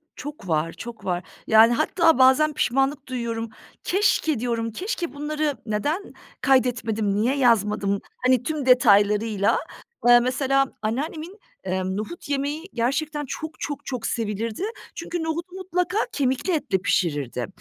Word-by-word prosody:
Çok 285 -7 -8
var, 160 0 0
çok 235 -1 -9
var. 180 -1 -1 0.2
Yani 225 +2 +7
hatta 330 +4 +3
bazen 265 +4 +5
pişmanlık 270 +2 0
duyuyorum. 230 -3 -3 0.3
Keşke 360 - +1
diyorum, 230 -1 -2
keşke 355 - -4
bunları 295 -1 -2
neden 290 - -2 0.3
kaydetmedim, 230 -6 +1
niye 235 +6 +1
yazmadım. 210 -5 +2 0.2
Hani 255 -1 +4
tüm 300 0 -3
detaylarıyla, 210 -4 +4 0.5
eee, 240 0 +8
mesela 270 +2 +2 0.2
anneannemin, 310 - -4 0.2
emm, 185 0 -2
nohut 220 +10 -6
yemeği 290 +3 -2
gerçekten 295 +5 -1
çok 310 +4 -6
çok 290 -2 -5
çok 250 -4 -4
sevilirdi. 225 - -3 0.3
Çünkü 340 0 -4
nohutu 335 +3 -4
mutlaka 365 0 -2
kemikli 270 +6 0
etle 285 - 0
pişirirdi. 145 - -1
255 Hz, 125 wpm, -24 LUFS, 220-305 Hz, 0.5 s, eee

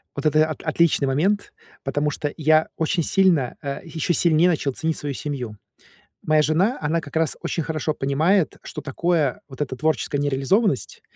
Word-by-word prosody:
Вот 140 - -5
это 155 +1 +4
от 155 - -5
отличный 160 -3 +2
момент, 185 +10 0 0.3
потому 145 +2 0
что 145 0 -3
я 155 0 +4
очень 165 +1 0
сильно, 175 -10 +2
э, 140 -1 -3
еще 165 0 -2
сильнее 170 +1 +4
начал 145 -4 0
ценить 160 +4 -2
свою 145 -1 -4
семью. 125 -8 -5 0.7
Моя 155 0 +3
жена, 180 - +1
она 160 +2 0
как 145 - -12
раз 160 -2 +1
очень 165 - -2
хорошо 155 0 -2
понимает, 155 +7 +1
что - - -6
такое 155 -1 0
вот 135 +1 -12
эта 130 -3 -2
творческая 155 0 0
нереализованность, 145 - 0
155 Hz, 165 wpm, -23 LUFS, 140-165 Hz, 0.7 s, это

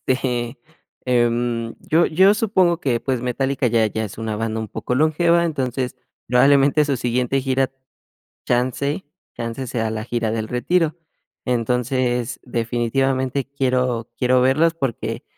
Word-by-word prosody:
Este, 120 -2 -2 0.5
em, 120 -1 0
yo 165 +2 +2
yo 190 +5 +5
supongo 185 -6 +2
que, 120 -7 0
pues 130 -3 -2
Metallica 130 +1 0
ya 115 -1 +3
ya 110 +2 -3
es 105 - -9
una 110 -1 -3
banda 110 0 -2
un 110 - -5
poco 125 - -3
longeva. 170 +3 +3
Entonces 130 -5 -2 0.3
probablemente 140 +4 +4
su 140 -2 0
siguiente 125 +2 0
gira, 135 0 +1 0.8
chance 130 +7 0 0.3
chance 115 +3 -4
sea 115 -2 -1
la 110 0 -4
gira 115 -1 -2
del 110 -1 -2
retiro. 165 +6 +1 0.5
Entonces, 125 0 0
definitivamente 130 +3 -1
quiero 125 -4 0
quiero 125 0 +3
verlos 155 +6 +3
porque 135 -7 -3
125 Hz, 135 wpm, -21 LUFS, 120-140 Hz, 0.8 s, yo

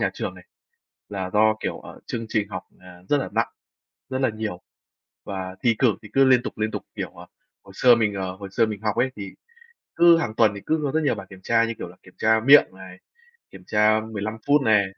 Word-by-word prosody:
nhà - - +1
trường - - -4
này, - - -15 0.6
là 95 -2 -4
do, 110 +1 +4
kiểu, - - -4
ờ, - - -12
chương 115 -1 -4
trình 105 -3 -1
học, 95 - -6 0.2
à, 90 -1 -14
rất 145 - +3
là 135 - -3
nặng, - - +1 0.6
rất 130 - -2
là 130 - +2
nhiều, 110 -5 -5 0.6
và 95 -1 -6
thi 115 - +4
cử 120 -5 +3
thì 105 - -11
cứ 135 - +5
liên 130 -2 +5
tục, - - -6
liên 110 0 0
tục. - - -5
Kiểu, - - -4
ờ, - - -13 0.4
hồi 100 - -15
xưa 125 -1 +6
mình 110 -3 0
ờ, 95 -1 -4
hồi 100 0 -8
xưa 115 - +3
mình 105 -2 -5
học 105 -2 -1
ấy, 130 +1 +1
thì 100 -2 -7 0.7
cứ 170 -1 +7
hàng 120 -7 -3
tuần 110 -3 +4
thì 100 - -7
cứ 155 -3 0
rất 160 - +3
nhiều 145 - +2
bài 95 -3 -9
kiểm 95 -1 -12
tra, 115 +2 +2
như 115 0 -3
kiểu - - -6
là, 90 - -15
kiểm 95 - -18
tra 110 0 +3
miệng 140 +3 +8
này, 95 -1 -12 0.5
kiểm - - -14
tra 105 +1 +3
15 110 +1 -4
phút 145 0 +4
này. 105 -4 +4
110 Hz, 240 wpm, -23 LUFS, 100-120 Hz, 0.7 s, miệng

